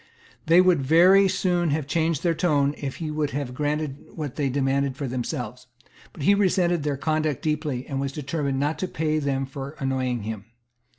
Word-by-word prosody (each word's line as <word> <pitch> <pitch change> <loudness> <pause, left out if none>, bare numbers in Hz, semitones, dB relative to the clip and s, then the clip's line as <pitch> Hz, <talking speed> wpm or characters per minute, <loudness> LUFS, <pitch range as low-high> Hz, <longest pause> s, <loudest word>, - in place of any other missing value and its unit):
They 170 +3 +7
would 180 -5 +3
very 180 +8 +6
soon 180 -2 +1
have 150 0 0
changed 160 +1 0
their 170 -2 +2
tone 150 -4 +2
if 135 -2 -5
he 160 -2 -4
would 150 -1 -1
have 135 -4 -4
granted 150 0 -2
what 150 -5 -5
they 140 -3 0
demanded 135 0 0
for 140 - -3
themselves. 125 0 -4 0.4
But 145 - -8
he 200 - +5
resented 180 -4 +2
their 145 -1 -1
conduct 155 -1 -1
deeply, 150 -4 -1
and 135 -1 -3
was 140 0 -2
determined 140 -1 -2
not 150 +2 -1
to 185 - -1
pay 155 -2 -1
them 135 -2 -1
for 135 +2 -7
annoying 130 -4 -1
him. 110 -1 -5
145 Hz, 185 wpm, -25 LUFS, 135-160 Hz, 0.4 s, They